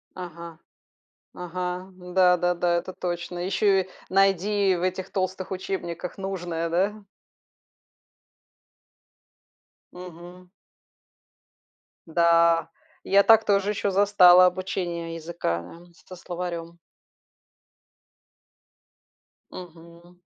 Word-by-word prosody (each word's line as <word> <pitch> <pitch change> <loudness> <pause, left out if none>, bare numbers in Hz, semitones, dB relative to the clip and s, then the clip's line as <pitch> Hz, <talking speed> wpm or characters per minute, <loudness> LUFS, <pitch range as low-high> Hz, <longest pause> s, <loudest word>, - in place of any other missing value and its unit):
Ага. 170 -2 -9 0.8
Ага. 180 +1 -5
Да-да-да, 180 -1 +2
это 185 +2 -5
точно. 175 0 -5
Еще 195 +1 +2
и 185 - -18 0.2
найди 195 +1 +2
в 175 - -4
этих 185 0 -3
толстых 185 -1 -3
учебниках 180 -2 -5
нужное, 175 -4 -4
да? 200 +5 -1 2.9
Мгм. 180 0 -12 1.6
Да, 170 0 +3 0.3
я 200 +1 +4
так 225 +1 +5
тоже 200 -1 +1
еще 205 -1 -1
застала 185 -2 +6
обучение 175 -2 -3
языка, 160 - -5
э, - - -24
со 185 - -10
словарем. 170 -1 -6 2.7
Мгм. 170 0 -13
180 Hz, 80 wpm, -25 LUFS, 170-190 Hz, 2.9 s, застала